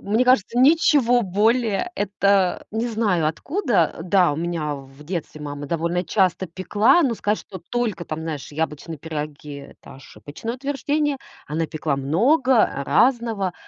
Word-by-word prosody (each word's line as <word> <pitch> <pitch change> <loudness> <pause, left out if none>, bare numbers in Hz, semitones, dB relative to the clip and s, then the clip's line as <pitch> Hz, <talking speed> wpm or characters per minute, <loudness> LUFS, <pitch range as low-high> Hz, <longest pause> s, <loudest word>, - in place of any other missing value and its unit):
Мне 220 +5 +1
кажется, 245 -2 +2
ничего 275 -4 +4
более, 220 - +1
это 200 -2 +1
не 225 +2 -2
знаю 210 -8 +1
откуда. 205 - 0
Э, 165 - -6
да, 180 -2 +3
у - - -4
меня 160 -3 -2
в 135 +1 -13
детстве 160 -2 -5
мама 145 0 -6
довольно 170 +3 -1
часто 190 +1 +1
пекла, 210 - +2
но 255 -5 +1
сказать, 210 -1 -1
что 190 - -10
только 235 -7 -1
там, 155 -1 -5
знаешь, 155 -3 -6
яблочные 160 +1 -4
пироги 150 -1 -6
это 140 0 -13
ошибочное 145 - -8
утверждение. 285 +2 -1 0.3
Она 160 +2 -1
пекла 155 -3 -2
много 235 - +3 0.2
разного. 225 - +1
190 Hz, 145 wpm, -22 LUFS, 155-240 Hz, 0.3 s, ничего